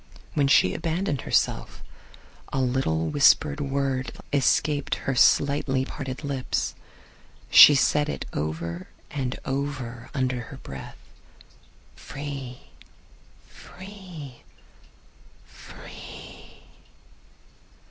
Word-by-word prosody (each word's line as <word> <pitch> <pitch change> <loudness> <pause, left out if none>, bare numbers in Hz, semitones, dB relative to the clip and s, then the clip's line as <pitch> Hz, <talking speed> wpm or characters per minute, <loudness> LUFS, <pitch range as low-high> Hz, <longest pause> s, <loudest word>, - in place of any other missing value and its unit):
When 145 -2 +2
she 90 -8 +5
abandoned 165 -2 -2
herself - - -1 0.7
a 135 - -1
little 125 -12 0
whispered 145 - +4
word 135 -2 -1 0.2
escaped 145 +1 +2
her 135 - -3
slightly 135 +1 +3
parted 135 0 -6
lips. 140 -3 -2 0.8
She 145 - +10
said 150 +2 +2
it - - -4
over 85 +4 -4 0.2
and 130 -3 -3
over 130 -4 -4
under 130 -2 0
her 125 +3 -10
breath: 65 - -9 1.0
"free, 140 -3 -7 0.9
free, 180 -9 -11 1.0
free!" - - -12
135 Hz, 85 wpm, -25 LUFS, 125-145 Hz, 1.0 s, She